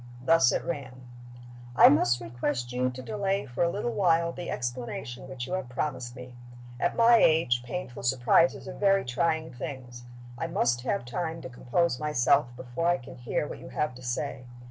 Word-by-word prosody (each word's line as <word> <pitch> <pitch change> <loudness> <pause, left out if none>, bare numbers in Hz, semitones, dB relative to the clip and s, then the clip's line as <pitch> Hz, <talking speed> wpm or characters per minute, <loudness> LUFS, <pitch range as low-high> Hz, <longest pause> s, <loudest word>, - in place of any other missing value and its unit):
Thus 160 -6 +5
it - - -1
ran: 130 -6 -5 0.7
"I - - +9
must 120 -4 +3
request 120 +2 -3
you 125 +1 +1
to 130 0 -8
delay 200 +4 -1
for 120 +4 -2
a 170 - +2
little 205 +6 -2
while 170 -5 +2
the 175 0 -7
explanation 125 +1 -5
which 130 -3 -5
you 180 - -6
have 185 -10 -3
promised 125 -2 -3
me. 125 0 -10 0.5
At 175 - 0
my 235 0 +6
age, 155 - +3
painful 125 +1 -6
surprises 130 +9 +3
are 185 - -6
very 195 -1 +2
trying 160 +5 -1
things. 125 -1 -8 0.3
I - - -2
must 120 0 +1
have 120 -1 -2
time 165 +5 -3
to - - -6
compose 125 +4 0
myself, 140 -2 +3
before 130 +7 -3
I 175 0 +3
can 130 +2 -11
hear 120 +4 -2
what - - -7
you - - -10
have 150 -3 -1
to 125 - -12
say. 125 +1 -3
130 Hz, 185 wpm, -28 LUFS, 120-170 Hz, 0.7 s, I